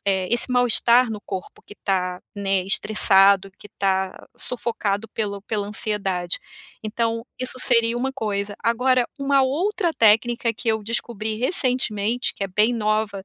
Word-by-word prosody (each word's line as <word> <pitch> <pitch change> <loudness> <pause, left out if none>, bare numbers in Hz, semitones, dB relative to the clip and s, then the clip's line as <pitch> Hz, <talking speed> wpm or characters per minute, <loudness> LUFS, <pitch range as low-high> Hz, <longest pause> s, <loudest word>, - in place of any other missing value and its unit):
eh, 190 -2 0
esse 240 +2 +3
mal-estar 245 0 +4
no 215 -2 -6
corpo 190 -2 -8
que 205 - -12
tá, 180 -3 -2
né, 195 -2 -1
estressado, 195 -1 +5
que 205 - -12
tá 190 -1 -1
sufocado 225 -3 -3
pelo 200 -2 -4
pela 205 -1 -4
ansiedade, 195 -5 -1 0.4
então 230 +1 -2 0.2
isso 255 0 -3
seria 230 -2 +2
uma 265 +2 -2
coisa, 205 -4 -4
agora, 250 +2 +2
uma 275 0 +2
outra 340 +7 -1
técnica 230 +2 +2
que 225 - -5
eu 220 -1 -3
descobri 220 -1 -4
recentemente, 245 - -1
que - - -7
é - - -5
bem 210 +5 +2
nova 215 -3 -1
215 Hz, 145 wpm, -22 LUFS, 200-240 Hz, 0.4 s, estressado